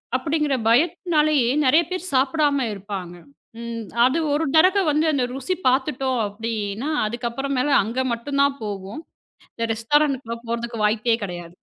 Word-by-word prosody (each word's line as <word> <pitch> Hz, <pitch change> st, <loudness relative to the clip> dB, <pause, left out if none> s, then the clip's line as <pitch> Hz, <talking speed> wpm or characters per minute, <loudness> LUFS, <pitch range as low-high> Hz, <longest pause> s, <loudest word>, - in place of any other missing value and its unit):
அப்படிங்கிற 295 Hz, +1 st, 0 dB
பயத்தினாலேயே 305 Hz, -1 st, +2 dB, 0.2 s
நிறைய 310 Hz, +6 st, +5 dB
பேர் 370 Hz, 0 st, -4 dB
சாப்பிடாம 280 Hz, 0 st, +2 dB
இருப்பாங்க. 190 Hz, -3 st, -7 dB, 0.9 s
அது 265 Hz, +6 st, +2 dB, 0.2 s
ஒரு 305 Hz, +2 st, +1 dB
தடவை 375 Hz, +5 st, +5 dB
வந்து 305 Hz, +2 st, +1 dB
அந்த 270 Hz, -4 st, 0 dB
ருசி 270 Hz, +7 st, -2 dB
பாத்துட்டோம் 260 Hz, -1 st, +1 dB
அப்படின்னா 220 Hz, +4 st, -4 dB, 0.2 s
அதுக்கப்புறம் 240 Hz, +4 st, -3 dB, 0.3 s
அங்க 230 Hz, +5 st, -4 dB
மட்டும் 280 Hz, +4 st, -3 dB
தான் 280 Hz, 0 st, +1 dB
போவோம். 200 Hz, +6 st, -6 dB, 0.5 s
இந்த 230 Hz, -, -2 dB
ரெஸ்டாரென்ட் 240 Hz, -1 st, 0 dB
போறதுக்கு 235 Hz, -1 st, -3 dB
வாய்ப்பே 220 Hz, +2 st, +2 dB
கிடையாது. 175 Hz, -2 st, -7 dB
255 Hz, 125 wpm, -22 LUFS, 225-295 Hz, 0.9 s, நிறைய